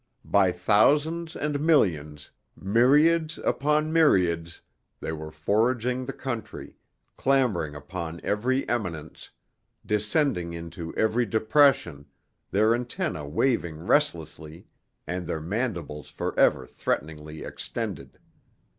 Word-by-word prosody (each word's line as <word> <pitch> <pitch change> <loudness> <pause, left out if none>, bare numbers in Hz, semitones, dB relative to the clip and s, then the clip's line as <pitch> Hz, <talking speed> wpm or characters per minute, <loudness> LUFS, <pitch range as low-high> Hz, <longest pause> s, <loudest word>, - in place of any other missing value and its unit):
By 95 -2 +3
thousands 145 - +2
and 150 -1 -2
millions, 80 - +1 0.2
myriads 150 - +3
upon 150 +3 0
myriads, 85 - +2 0.4
they - - -4
were 80 -1 -6
foraging 120 +10 0
the - - -2
country, 120 -5 -6 0.4
clambering 120 - +1
upon 85 +2 -6
every 125 +6 0
eminence, 85 -10 -4 0.6
descending 105 - 0
into 85 0 -7
every 115 +2 +1
depression, 110 - +2 0.4
their 110 +3 +3
antennae 120 - -3
waving 85 - 0
restlessly 80 - -1 0.4
and 90 -1 -4
their 80 - -2
mandibles 85 - -4
forever - - +1
threateningly 75 0 -4
extended. 95 - -6
105 Hz, 95 wpm, -26 LUFS, 80-135 Hz, 0.6 s, By